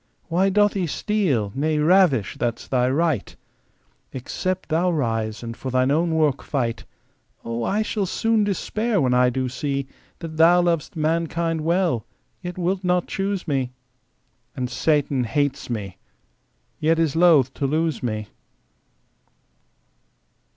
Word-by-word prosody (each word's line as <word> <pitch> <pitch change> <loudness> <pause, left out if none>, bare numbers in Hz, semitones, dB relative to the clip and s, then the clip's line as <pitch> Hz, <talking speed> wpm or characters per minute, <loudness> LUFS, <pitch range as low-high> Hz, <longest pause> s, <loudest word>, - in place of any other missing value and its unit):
Why 185 +4 +2
doth 205 +1 +3
he 185 -4 -1
steal, 150 - 0
nay 155 +3 0
ravish, 150 - +3
that's 120 -1 -2
Thy 125 -1 +1
right? 150 - 0 0.8
Except 185 +8 -3
Thou 170 +3 +2
rise 115 -8 -1
and 115 0 -6
for 130 - -6
Thine 130 +1 +2
own 165 +2 +1
work 150 -4 +2
fight, 120 -5 -2 0.6
O! 115 0 -3
I 210 - +1
shall 210 -2 -2
soon 225 +3 +1
despair, 210 +2 -1
when 130 -4 +2
I 125 0 +4
shall 130 +1 -1
see 140 +2 -2 0.3
That 160 -2 -8
Thou 175 +2 +6
lovest 170 -1 -1
mankind 165 +1 0
well, 170 - +1 0.4
yet 180 -1 -6
wilt 185 +2 -1
not 180 -1 +1
choose 195 -1 -3
me, 130 -4 -1 0.8
And 125 -1 -3
Satan 140 0 +1
hates 140 +2 -1
me, 100 -5 -4 0.8
yet 160 +2 +2
is 165 -3 +1
loth 160 -7 +5
to 140 - -1
lose 160 +2 0
me. 110 -4 -3
155 Hz, 135 wpm, -23 LUFS, 130-175 Hz, 0.8 s, Thou